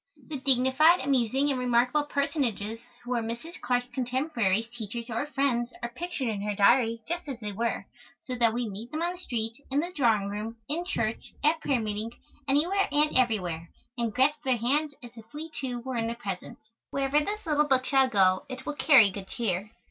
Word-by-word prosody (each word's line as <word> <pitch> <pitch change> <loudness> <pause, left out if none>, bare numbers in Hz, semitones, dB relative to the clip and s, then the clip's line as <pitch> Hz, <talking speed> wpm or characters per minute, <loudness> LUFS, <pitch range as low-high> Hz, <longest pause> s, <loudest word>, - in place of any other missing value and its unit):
The 295 -3 -4
dignified, 265 +5 +5
amusing 270 +1 +2
and 260 - -1
remarkable 250 +4 +2
personages 245 -7 -1 0.2
who 245 - -7
were 240 -2 +1
Mrs. 235 +10 -6
Clarke's 245 0 +1
contemporaries, 245 -5 0
teachers, 235 +1 -5
or 235 +6 -1
friends 260 -4 0
are 240 - -1
pictured 295 +1 -4
in 210 -3 -2
her 205 0 -2
Diary 230 +2 +4
just 345 -1 -3
as 265 -4 -5
they 210 -2 -4
were, 225 -1 -2 0.4
so 255 - -5
that 235 -2 +3
we 240 +1 -2
meet 215 +4 -7
them 310 +5 -3
on 345 - +1
the 360 - -8
street, 225 -9 -3 0.2
in 275 +2 +1
the 345 +4 -2
drawing 225 - +2
room, 215 +3 -5
in 335 +4 -2
church, 230 - -2
at 315 +2 +3
prayer 270 -4 +1
meeting, 215 0 -3 0.4
anywhere 340 +9 +2
and 300 +1 +3
everywhere, 180 -10 +1 0.3
and 235 -2 -1
grasp 295 +4 +3
their 260 -3 +2
hands 285 +6 0
as 240 - -9
if 225 0 -13
we, 315 +2 -6
too, 250 -5 -4
were 260 0 -4
in 225 0 0
their 230 - -3
presence. 210 0 -7 0.2
Wherever 275 +1 +1
this 415 +7 -3
little 300 -2 +2
book 260 -2 +3
shall 270 -1 +3
go 185 -4 +3
it 260 0 -7
will 300 - -2
carry 265 -9 +6
good 195 0 -8
cheer. 205 -3 -2
245 Hz, 200 wpm, -28 LUFS, 225-285 Hz, 0.4 s, carry